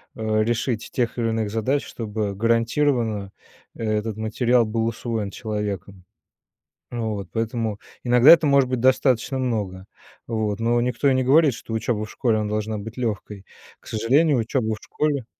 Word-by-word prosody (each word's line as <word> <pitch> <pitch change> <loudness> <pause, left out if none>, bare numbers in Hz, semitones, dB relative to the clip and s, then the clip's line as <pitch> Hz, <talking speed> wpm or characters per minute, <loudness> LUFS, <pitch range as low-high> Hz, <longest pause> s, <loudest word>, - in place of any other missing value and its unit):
э, 110 -1 0
решить 120 0 -1
тех 125 -6 -1
или 115 -1 0
иных 110 -2 -1
задач, 125 +6 0
чтобы 105 -2 -4
гарантированно 115 -2 +1 0.4
этот 110 -1 -2
материал 115 +2 +2
был 110 +1 -1
усвоен 115 -3 -3
человеком. 100 -4 -5 0.9
Вот. 110 -5 -3
Поэтому 115 -2 -2 0.3
иногда 125 +2 +6
это 165 -2 +8
может 140 -2 +4
быть 130 - 0
достаточно 130 0 +2
много, 105 -7 -2 0.4
вот, 110 -2 -2
но 120 +1 +2
никто 125 +3 +1
и - - +3
не 130 0 +1
говорит, 145 +2 +5
что 115 - -9
учеба 110 -1 -1
в - - -10
школе, 115 -5 +1
она 105 -1 -2
должна 105 0 -2
быть 110 +2 -8
легкой. 105 -4 -4 0.4
К - - -16
сожалению, 135 +7 +2
учеба 110 -1 -1
в - - -9
школе 145 -5 -2
115 Hz, 155 wpm, -23 LUFS, 105-125 Hz, 0.9 s, это